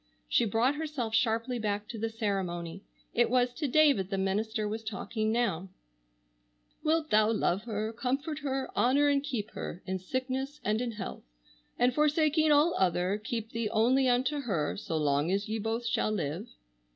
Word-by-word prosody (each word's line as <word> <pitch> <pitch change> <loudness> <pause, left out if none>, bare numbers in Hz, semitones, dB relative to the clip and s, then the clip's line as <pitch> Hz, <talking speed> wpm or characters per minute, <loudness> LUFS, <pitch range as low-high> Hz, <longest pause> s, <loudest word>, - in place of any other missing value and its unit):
She 240 - +3
brought 230 +6 +2
herself 295 -7 -3
sharply 230 +2 +1
back 210 -1 -2
to 225 - -6
the 225 +1 -1
ceremony. 190 -6 -3 0.3
It 240 0 +3
was 245 0 +2
to 295 +3 -2
David 275 -9 +4
the 195 - -1
minister 210 +3 -1
was 220 +2 -4
talking 220 +1 -2
now: 205 -6 0 1.1
"Wilt 315 0 +1
thou 215 +1 +5
love 205 -1 0
her, 215 -1 -3
comfort 275 +6 -2
her, 270 -2 -2
honor 280 +4 +4
and 280 -1 +3
keep 240 -7 -3
her, 175 - -6
in 190 0 -2
sickness 260 +7 -3
and 215 +2 +1
in 240 -2 -2
health, 205 -3 -6 0.6
and 245 +1 +3
forsaking 305 +1 +3
all 300 +4 +5
other, 185 +2 +1
keep 225 0 -4
thee 230 -2 -2
only 250 +5 +3
unto 260 +4 +1
her, 190 - -1
so 165 -5 -3
long 145 +1 +1
as 200 +2 0
ye 220 +1 -2
both 225 +2 -2
shall 230 - +1
live?" 185 +1 -3
225 Hz, 170 wpm, -30 LUFS, 205-265 Hz, 1.1 s, thou